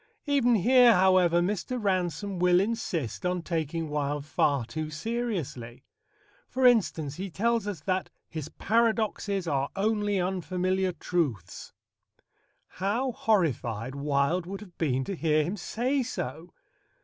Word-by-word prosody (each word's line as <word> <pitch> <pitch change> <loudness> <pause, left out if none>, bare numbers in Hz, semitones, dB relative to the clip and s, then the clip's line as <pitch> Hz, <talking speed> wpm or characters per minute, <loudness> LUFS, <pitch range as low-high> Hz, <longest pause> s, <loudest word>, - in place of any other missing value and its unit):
Even 270 -5 +3
here, 240 +3 +6
however, 180 -2 +4
Mr. 205 +7 -2
Ransome 185 -2 -1
will 180 0 +4
insist 195 - -2
on 180 -1 -1
taking 165 -1 -2
Wilde 145 -1 -2
far 140 -4 +1
too 155 +5 -4
seriously. 155 - -4 0.6
For 260 0 0
instance, 165 - +3
he 190 +2 -4
tells 230 +3 0
us 190 -7 -4
that 185 +2 -1 0.2
"his 155 -2 -6
paradoxes 215 -3 0
are 140 -2 0
only 205 -1 +1
unfamiliar 185 +1 0
truths." 150 - -3 1.0
How 225 +8 -1
horrified 130 - 0
Wilde 140 +5 0
would 195 +2 -6
have 185 -5 -13
been 135 -5 +1
to 195 - -4
hear 155 -2 +2
him 175 +7 -3
say 250 +8 -1
so! 170 - -5
180 Hz, 125 wpm, -28 LUFS, 155-210 Hz, 1.0 s, here